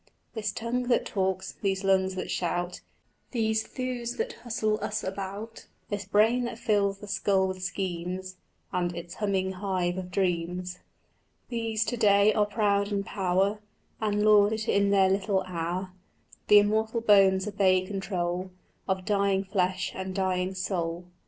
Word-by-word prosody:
"This 215 -3 -2
tongue 240 +3 -2
that 245 - +2
talks, 190 -1 -1
these 195 -1 0
lungs 190 -1 +2
that 185 - -4
shout, 175 0 -2 0.5
These 220 -2 +1
thews 245 -1 -4
that 460 +2 -2
hustle 215 -2 -2
us 215 0 -2
about, 200 +4 -6 0.2
This 205 -1 -3
brain 225 +4 +3
that 235 - -5
fills 200 -3 +1
the 205 - -10
skull 195 -1 +1
with 185 0 -5
schemes, 185 0 -4 0.4
And 175 -1 -1
its 170 0 -7
humming 190 -3 -1
hive 185 -2 -1
of 180 -1 -6
dreams, 180 -1 -1 0.3
" - - -43
"These 225 -2 -1
to 240 +3 -2
day 205 -1 +5
are 210 0 +2
proud 205 -1 +1
in 200 -1 0
power 195 +1 0 0.4
And 210 -1 +1
lord 210 0 +6
it 220 +1 -3
in 200 0 +3
their 195 -1 +5
little 195 0 +1
hour: 180 +1 -3 0.6
The 210 - +8
immortal 220 +2 +2
bones 195 -3 +5
obey 190 -2 +3
control 185 -2 -3 0.4
Of 190 -1 -1
dying 200 -2 +2
flesh 185 -1 -1
and 190 0 -5
dying 185 -1 0
soul." 175 -2 -2
195 Hz, 150 wpm, -28 LUFS, 185-210 Hz, 0.6 s, The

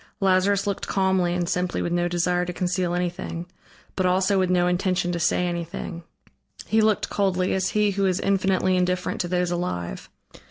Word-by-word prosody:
Lazarus 195 +1 +2
looked 200 -1 -3
calmly 190 -2 +1
and 175 -1 -1
simply 180 +1 -1
with 170 - -2
no 175 0 +1
desire 175 0 +1
to 180 - -4
conceal 180 0 -1
anything, 175 -1 -3 0.5
but 185 -1 +1
also 190 +2 +2
with 185 -1 +1
no 180 -1 +3
intention 180 0 0
to 170 - -2
say 175 +2 +1
anything; 170 0 -4 0.6
he 220 0 +2
looked 215 -1 +1
coldly, 185 -2 +1
as 190 -1 0
he 210 -1 +3
who 195 0 +1
is 185 0 0
infinitely 190 -1 +1
indifferent 180 0 0
to 175 - -3
those 180 0 0
alive. 90 - -4
180 Hz, 175 wpm, -24 LUFS, 175-190 Hz, 0.6 s, no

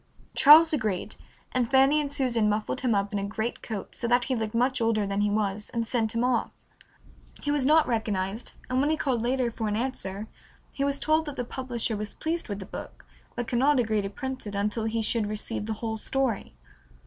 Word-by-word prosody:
Charles 315 +3 +8
agreed, 215 -10 -1 0.4
and 245 -2 0
Fanny 275 +3 +5
and 285 -1 -4
Susan 245 -7 +1
muffled 215 +4 -1
him 245 -5 +2
up 200 +1 -1
in 205 - 0
a - - -3
greatcoat 220 0 -4
so 235 - -3
that 245 +1 +3
he 260 - -1
looked 220 -1 -3
much 250 +1 +1
older 225 -2 +2
than 200 +1 -1
he 210 - +2
was, 210 0 -1
and 230 -1 0
sent 225 -1 -1
him 230 - +1
off. 250 -2 +1 0.9
He 290 - 0
was 285 -3 +2
not 310 +1 +5
recognized, 215 -2 -2
and 255 +1 +1
when 290 - +2
he 315 - +1
called 255 -6 0
later 245 0 0
for 220 -1 -3
an 210 - 0
answer 215 -4 -3 0.5
he 275 - -2
was 280 0 0
told 315 0 +2
that 290 - -5
the 245 - -3
publisher 240 -3 -2
was 210 0 -5
pleased 330 -4 -3
with 200 - -3
the 195 - -7
book, - - -9 0.3
but 240 -1 -3
could 240 - 0
not 280 +1 +4
agree 220 -3 +1
to 195 - -4
print 260 +2 -6
it 205 - -5
until 210 +2 -1
he 225 0 -1
should 220 -1 +1
receive 210 0 -4
the 220 - -1
whole 220 0 -2
story. 250 - -2
235 Hz, 220 wpm, -27 LUFS, 210-265 Hz, 0.9 s, Charles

